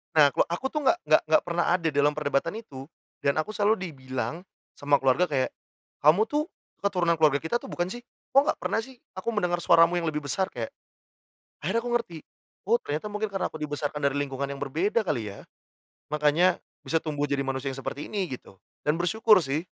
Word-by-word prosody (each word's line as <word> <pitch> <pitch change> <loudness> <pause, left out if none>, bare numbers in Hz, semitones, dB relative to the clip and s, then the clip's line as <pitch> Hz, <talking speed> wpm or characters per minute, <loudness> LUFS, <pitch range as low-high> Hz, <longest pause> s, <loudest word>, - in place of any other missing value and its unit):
nah 145 -2 +7
ku - - -8
aku 175 +10 -4
tuh 300 - -1
nggak - - +5
nggak - - +5
nggak 155 - +4
pernah 175 0 0
ada 165 -3 -1
dalam 145 +1 +2
perdebatan 150 +3 0
itu, 140 -12 -9 0.3
dan 140 - +1
aku 155 +7 -1
selalu 210 +1 +2 0.2
dibilang 130 +1 -4 0.4
sama 145 0 +3
keluarga 135 +8 +3
kayak, 135 -4 0 0.5
"Kamu 160 +9 +5
tuh 300 +2 0 0.3
keturunan 175 -4 +1
keluarga 150 -3 +4
kita 240 +9 0
atau - - -10
bukan 175 +1 -2
sih? 240 - -5 0.3
Kok 275 - +7
nggak - - 0
pernah - - 0
sih 260 +3 -8 0.2
aku 185 - -7
mendengar 175 -3 +1
suaramu 165 +1 +5
yang 165 - -2
lebih 150 -1 -2
besar?" 185 +7 0
Kayak, 115 -2 -5 0.9
akhirnya 200 +9 +1
aku 245 - -3
ngerti. 180 -9 -2 0.5
Oh, 230 - +5
ternyata 150 +8 -3
mungkin 210 0 -3
karena 195 - -1
aku 155 - -9
dibesarkan 150 0 -3
dari 140 0 +2
lingkungan 140 -1 -2
yang 140 - -6
berbeda 165 - 0
kali 110 -7 -1
ya, - - -13 0.6
makanya 150 +4 +3 0.3
bisa 165 - +1
tumbuh 145 -2 -1
jadi 140 -1 0
manusia 135 0 -3
yang 135 0 -6
seperti 145 - -4
ini 200 -3 -1
gitu, - - -18 0.3
dan 150 - +3
bersyukur 195 +2 +4
sih. 145 +5 -2
155 Hz, 195 wpm, -27 LUFS, 145-190 Hz, 0.9 s, nah